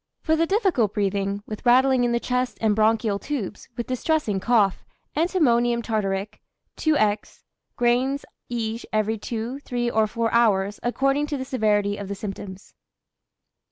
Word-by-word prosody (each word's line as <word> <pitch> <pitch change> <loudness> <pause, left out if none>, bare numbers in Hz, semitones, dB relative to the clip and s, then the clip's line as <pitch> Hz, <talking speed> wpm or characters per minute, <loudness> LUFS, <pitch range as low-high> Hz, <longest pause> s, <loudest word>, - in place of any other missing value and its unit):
For 315 - +2
the 330 +1 +1
difficult 375 - +1
breathing, 200 0 -1
with 215 - -7
rattling 255 +1 +4
in 240 - +1
the 235 - +1
chest 250 +1 -1
and 215 -2 +2
bronchial 220 -1 +2
tubes, 245 -9 -5
with 235 - -2
distressing 255 -5 0
cough, 205 -2 +2 0.3
antimonium 240 -9 +2
tartaric., 205 -2 -2 0.4
2^{×}, 215 -10 0 0.3
grains 250 +3 +1 0.2
iij 230 -1 -3
every 215 0 0
2, 230 +5 -4
3 240 -3 -2
or 220 -1 +2
4 230 +1 -1
hours, 205 -4 +2
according 275 +4 +1
to 295 -1 -2
the 260 - -4
severity 210 -5 +1
of 200 - -6
the 200 - -4
symptoms. 195 -1 -8
230 Hz, 145 wpm, -24 LUFS, 210-255 Hz, 0.4 s, rattling